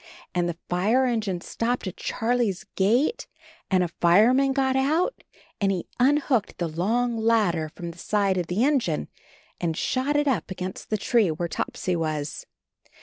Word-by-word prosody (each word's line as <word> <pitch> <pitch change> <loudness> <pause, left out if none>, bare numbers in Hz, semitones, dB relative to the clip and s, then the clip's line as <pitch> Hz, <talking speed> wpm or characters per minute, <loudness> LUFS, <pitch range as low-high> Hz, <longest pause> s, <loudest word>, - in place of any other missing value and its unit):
And 175 -1 +1
the 165 - -5
Are 215 +9 +3
engine 215 -7 -1
stopped 240 +5 -2
at 185 - -5
Charlie's 225 -5 -1
gate, 240 - +2 0.4
and 185 -2 +3
a - - 0
fireman 220 +12 +4
got 265 -1 +1
out, 315 - +1 0.4
and 195 -1 +3
he 185 -3 -2
un 275 +4 +5
hooked 255 -8 0
the 170 - -1
long 225 +9 0
ladder 210 -8 +2
from 170 +2 -7
the 170 - -16
side 200 -2 +1
of 175 - -3
the 195 +7 0
engine, 230 - 0 0.5
and 165 -2 -1
shot 265 +3 0
it 295 0 +2
up 220 - 0
against 185 0 -6
the 215 - +1
tree 215 -1 +2
where 170 +2 -2
Topsy 180 +1 -2
was. 155 -3 -3
205 Hz, 165 wpm, -25 LUFS, 175-250 Hz, 0.5 s, un